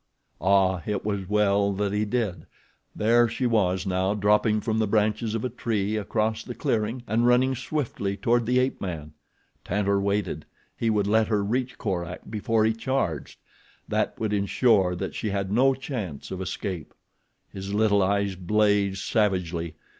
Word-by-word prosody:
Ah! 95 0 +3
It 105 -2 -2
was 100 -3 -2
well 100 -1 +2
that 100 +1 -1
he 105 +1 +1
did! 110 -4 -2 0.5
There 120 +2 +4
she 115 +3 -2
was 95 -5 +1
now 95 +1 0
dropping 105 +1 +3
from 110 -1 -1
the 110 - +1
branches 110 +1 +1
of 115 - -2
a - - -1
tree 110 -3 -1
across 110 +1 -1
the 120 - -7
clearing 115 +3 -1
and 115 +3 +1
running 125 +2 +4
swiftly 125 -7 -3
toward 120 -1 +1
the 125 +1 +2
ape 130 +1 0
man. 80 -5 -5 0.5
Tantor 100 +1 0
waited. 100 +1 -1 0.3
He 115 - 0
would 105 -2 +2
let 110 +2 +3
her 105 -2 +1
reach 125 +5 -2
Korak 90 -5 -3
before 110 0 +1
he 110 - +2
charged—that 115 - -4
would 110 -2 -1
ensure 100 -2 +2
that 90 - -4
she 110 - -3
had 100 -1 -2
no 130 +5 +4
chance 110 - -6
of 95 0 -4
escape. 95 -3 -5 0.6
His 95 0 -6
little 105 -1 +3
eyes 100 +1 +1
blazed 100 +1 +1
savagely. 90 -6 0
105 Hz, 160 wpm, -26 LUFS, 95-115 Hz, 0.6 s, There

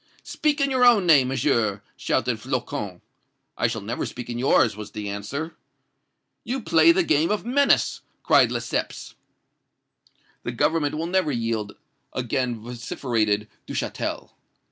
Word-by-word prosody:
"'Speak 300 -1 0
in 275 -1 +1
your 255 -1 +2
own 235 -6 +6
name, 145 -6 +6
Monsieur!' 115 -6 0
shouted 115 -1 -1
Flocon. 120 -7 -4 0.5
"'I - - +1
shall - - -4
never - - -3
speak 120 -1 -7
in 120 - -4
yours!' 120 -4 +3
was 105 -1 -9
the 105 -1 -5
answer. 140 +11 -5 0.9
"'You 260 +3 -3
play 165 -7 +5
the 180 +2 +2
game 155 0 +2
of 210 0 -1
menace!' 280 +4 +2 0.2
cried - - +5
Lesseps. - - -3 1.3
"'The - - -5
Government 155 -3 +1
will 160 - -2
never 185 -3 +1
yield!' 115 -4 -2 0.4
again 125 -2 -2
vociferated 115 -3 -1 0.2
Duchatel. - - -4
130 Hz, 135 wpm, -24 LUFS, 115-170 Hz, 1.3 s, own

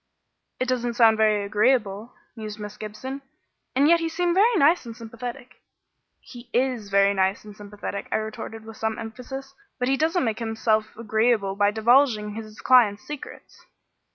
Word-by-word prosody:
"It 255 - -1
doesn't 240 -2 -1
sound 225 -2 +5
very 215 -2 +2
agreeable," 210 0 +1 0.2
mused 215 -2 -7
Miss 210 0 -7
Gibson; 240 +6 -7 0.5
"and 280 +3 +4
yet 335 +1 +5
he 330 0 -2
seemed 345 +1 0
very 440 +6 +4
nice 330 0 +4
and 230 -2 -9
sympathetic." 240 +2 -8 0.6
"He 240 -1 -13
is 245 -4 0
very 200 0 +4
nice 190 +1 0
and 210 -1 -11
sympathetic," 205 -1 -7
I - - +1
retorted 220 0 -5
with 225 -1 -11
some 220 0 -2
emphasis, 255 +4 -8 0.2
"but 250 - -1
he 270 - +2
doesn't 320 +3 +1
make 220 0 -2
himself 220 -1 -1
agreeable 220 -2 +1
by 205 0 +3
divulging 220 0 +3
his 215 -1 -9
clients' 230 -6 +4
secrets." 295 -2 -10
225 Hz, 160 wpm, -24 LUFS, 210-255 Hz, 0.6 s, sound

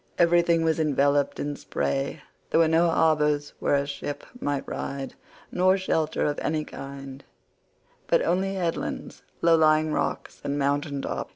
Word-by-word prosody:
Everything 170 -1 +4
was 160 0 +1
enveloped 145 -2 +2
in 145 0 -2
spray; 135 0 -2 0.3
there - - +3
were 165 - +5
no 165 +2 +3
harbours 150 -3 +2
where - - +2
a 140 0 +1
ship 140 0 -5
might 145 - -2
ride, 135 -1 -5 0.4
nor 185 +1 +3
shelter 160 -5 0
of 145 -1 -1
any 155 -1 -1
kind, 135 0 -9 0.8
but - - +4
only 190 +3 0
headlands, 175 -3 -3 0.2
low 165 0 +6
lying 155 -1 +3
rocks, - - -3
and 140 0 -2
mountain 140 0 -1
tops. - - -4
150 Hz, 150 wpm, -26 LUFS, 140-165 Hz, 0.8 s, low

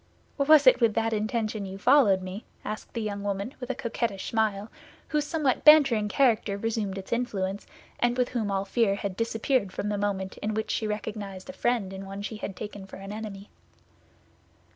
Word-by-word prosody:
"Was 290 +1 +6
it 255 - +7
with 225 -3 +3
that 225 0 +1
intention 215 -1 -1
you 190 +1 -7
followed 205 -5 +4
me?" 185 +4 -6 0.2
asked 215 0 -5
the 230 - -1
young 205 -1 -3
woman, 200 +4 -3
with 250 -1 -7
a 260 - -1
coquettish 230 -5 -3
smile, 215 -2 0 0.4
whose 300 -1 0
somewhat 300 -5 0
bantering 275 -9 +7
character 220 -4 +2
resumed 210 -2 -2
its 195 +3 -4
influence, 205 -5 -2 0.3
and 240 0 +1
with 250 -1 +1
whom 225 -5 -2
all 195 0 -1
fear 205 -1 +2
had 200 -2 -4
disappeared 230 -1 0
from 205 - -3
the 205 -1 -1
moment 195 -2 -2
in 215 0 -3
which 220 - -2
she 220 - -1
recognized 210 -1 -5
a - - -18
friend 230 -8 0
in 190 0 -6
one 195 +1 -6
she 215 +1 -5
had 200 -2 -5
taken 205 0 -7
for - - -10
an 195 +1 -8
enemy. 210 -2 -7
215 Hz, 190 wpm, -27 LUFS, 200-235 Hz, 0.4 s, it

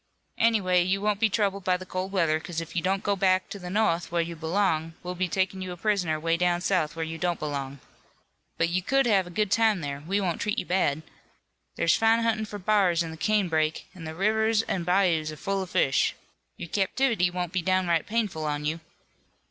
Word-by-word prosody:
"Anyway, 195 -6 +3
you 185 +2 +1
won't 205 0 0
be 225 0 +3
troubled 200 -1 0
by 185 0 +2
the 185 - -9
cold 185 +1 -4
weather 165 -5 +2
'cause 170 0 -5
if 165 +1 -8
you 170 - +1
don't 190 +2 0
go 200 - +1
back 185 -1 +2
into 200 - -9
the 180 -1 -7
no'th 180 -5 +1
where 170 - 0
you 170 0 -6
belong, 165 -1 0
we'll 180 0 -4
be 180 +1 -1
takin' 190 +1 -1
you 185 -1 -5
a 175 - -7
prisoner 180 -5 0
way 165 +1 +1
down 175 0 +1
south, 175 -4 0
where 165 0 -2
you 165 0 -6
don't 175 0 0
belong. 140 -2 -4 0.8
But 165 - +1
you 180 +2 0
could 270 +8 +2
have 195 -6 +3
a - - -8
good 205 +3 -1
time 220 -4 +3
there. 140 -2 -4
We 190 +7 -1
won't 180 -4 -2
treat 210 +3 -1
you - - -1
bad. 160 -5 0 0.7
There's 165 - +3
fine 225 +1 +3
huntin' 220 -1 0
for 205 0 -7
b'ars 185 -4 +2
in 165 - -6
the - - -7
canebrake 160 -5 0
an' 170 -3 -10
the 160 0 -6
rivers 220 +3 +2
an' 180 -6 -3
bayous 180 -4 +2
are - - -7
full 195 +4 -2
of 190 - -6
fish. 135 -6 +2 0.4
Your 170 - -7
captivity 205 0 +1
won't 180 -1 -4
be 185 - 0
downright 180 -2 +1
painful 210 -8 -1
on 150 0 -2
you." 160 +2 -1
180 Hz, 220 wpm, -26 LUFS, 165-200 Hz, 0.8 s, Anyway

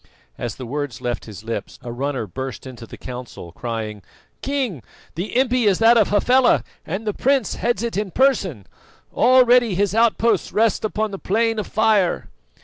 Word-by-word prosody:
As 115 - -5
the 130 - -8
words 140 -2 -4
left 120 -3 -3
his 105 -1 -10
lips, 110 -3 -5
a 120 - -6
runner 130 0 -3
burst 130 +4 -6
into 120 -3 -10
the - - -11
council, 125 -8 -8
crying: 110 0 -5 0.4
"King, 265 - -2 0.3
the 185 +8 -3
impi 250 -3 +2
is 195 -3 +3
that 225 +1 +6
of 220 -4 +4
Hafela, 245 +5 +3 0.2
and 190 +7 -4
the 210 - -1
prince 265 -3 +1
heads 235 -2 -1
it 235 - -3
in 205 0 -1
person. 195 - +1 0.5
Already 245 -4 +5
his 200 +1 +1
outposts 225 -2 +2
rest 220 0 +1
upon 215 0 -1
the 195 - -6
Plain 225 +2 0
of 210 - -4
Fire." 210 -4 +1
200 Hz, 170 wpm, -21 LUFS, -, 0.5 s, that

